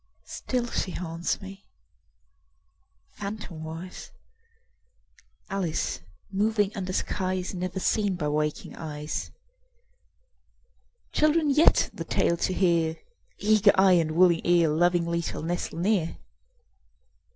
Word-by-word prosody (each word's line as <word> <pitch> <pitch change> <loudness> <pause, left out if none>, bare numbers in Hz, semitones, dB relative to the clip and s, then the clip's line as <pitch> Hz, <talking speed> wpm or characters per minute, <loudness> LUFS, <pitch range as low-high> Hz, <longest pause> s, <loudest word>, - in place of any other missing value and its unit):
Still 250 -2 -2
she - - -1
haunts 165 -1 -3
me, 195 +1 -11 1.5
phantomwise, 180 -4 -7 1.4
Alice 190 -5 -2 0.3
moving 205 +1 +1
under 185 -2 -3
skies 185 0 -2
Never 185 +1 -3
seen 205 0 +1
by 150 -4 -2
waking 150 0 -2
eyes. 150 -1 -5 1.8
Children 305 0 +3
yet, 300 +4 +4
the - - -5
tale 170 - +1
to 185 - 0
hear, 170 -3 +2 0.4
Eager 210 -1 +4
eye 190 0 +5
and 155 -1 -2
willing 175 0 +4
ear, 175 -2 +4
Lovingly 170 +1 +2
shall 165 - -5
nestle 170 0 -3
near. 180 -2 0
180 Hz, 100 wpm, -27 LUFS, 165-200 Hz, 1.8 s, eye